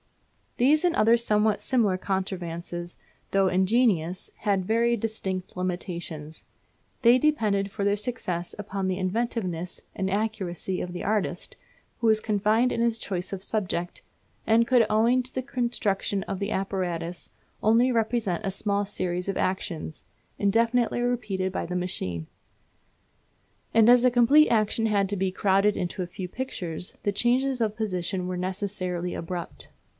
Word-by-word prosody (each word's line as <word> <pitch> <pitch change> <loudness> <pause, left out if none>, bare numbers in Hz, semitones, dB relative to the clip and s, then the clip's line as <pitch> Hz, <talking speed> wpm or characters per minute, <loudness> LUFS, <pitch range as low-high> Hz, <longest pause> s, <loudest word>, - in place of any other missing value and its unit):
These 295 +6 +4
and 350 -1 +2
other 225 +2 +5
somewhat 215 -2 +1
similar 220 -8 +2
contrivances, 175 -2 -4 0.3
though 195 -1 +3
ingenious, 185 -2 +2
had 195 -3 0
very 235 +3 +2
distinct 195 -4 -3
limitations. 175 -4 -4 0.6
They 240 +1 +7
depended 215 -9 +1
for 200 0 -3
their 200 0 +3
success 205 -6 -3
upon 195 -2 -3
the 185 -1 -1
inventiveness 185 -3 -2
and 190 - -1
accuracy 195 -3 -2
of 180 - -4
the 175 - -5
artist, 210 +1 -2 0.4
who 230 - +1
was 220 -1 +5
confined 215 +4 +2
in 230 - -1
his 235 -1 +2
choice 185 -4 -4
of 195 -1 -5
subject; 180 -5 -2 0.4
and 230 +1 +4
could, 245 -3 +5
owing 230 +4 +3
to 255 - -6
the 260 - -1
construction 225 -6 -1
of 195 -1 -4
the 200 +2 -2
apparatus, 180 -3 -3 0.3
only 230 +4 +4
represent 225 -6 0
a 195 - 0
small 200 +1 -1
series 180 -2 -3
of 195 - -1
actions, 170 -4 -3 0.3
indefinitely 230 +4 +2
repeated 215 -6 -1
by - - -3
the 180 - -4
machine. 90 - -3 1.5
And 225 -1 +6
as 245 0 +7
a 250 - +5
complete 250 +6 +6
action 225 0 +2
had 200 -3 +1
to 205 - -1
be 190 -1 0
crowded 195 +2 +2
into 180 +1 -3
a 180 - -3
few 180 +1 -6
pictures, 180 -7 -5
the 205 - +1
changes 250 +4 +1
of 215 -2 0
position 185 -3 -2
were 180 0 -3
necessarily 185 -1 -3
abrupt. 170 0 -6
200 Hz, 150 wpm, -26 LUFS, 185-230 Hz, 1.5 s, They